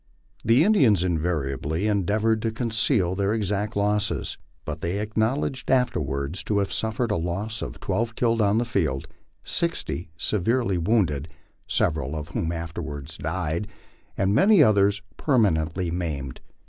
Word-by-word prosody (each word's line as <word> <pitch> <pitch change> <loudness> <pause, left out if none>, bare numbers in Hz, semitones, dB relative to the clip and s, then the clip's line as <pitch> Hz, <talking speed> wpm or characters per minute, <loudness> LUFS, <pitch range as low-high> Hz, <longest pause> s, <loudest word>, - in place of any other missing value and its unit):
The 115 +7 +5
Indians 135 - +4
invariably 80 -1 -1
endeavored 105 +2 +1
to 115 0 0
conceal 110 -4 +1
their 100 +3 0
exact 105 +1 -1
losses, 105 +1 0 0.3
but - - -5
they 85 +4 -1
acknowledged 110 +6 -1
afterwards 90 - 0
to 105 - 0
have 100 -1 0
suffered 110 +1 -1
a - - +1
loss 100 +7 -3
of - - -6
twelve 115 0 -1
killed 115 -2 +2
on 105 +1 +3
the 120 - +1
field, 80 - -1 0.4
sixty 170 - -1
severely 105 +1 +1
wounded, 85 -7 +1 0.4
several 75 -4 0
cf 80 0 -5
whom 85 -1 -2
afterwards 80 -3 -5
died, 85 +3 -2 0.5
and 95 +1 +2
many 205 - +5
otherg 100 -2 +3 0.2
permanently 90 - +1
maimed. 75 -7 -4
100 Hz, 135 wpm, -25 LUFS, 85-110 Hz, 0.5 s, The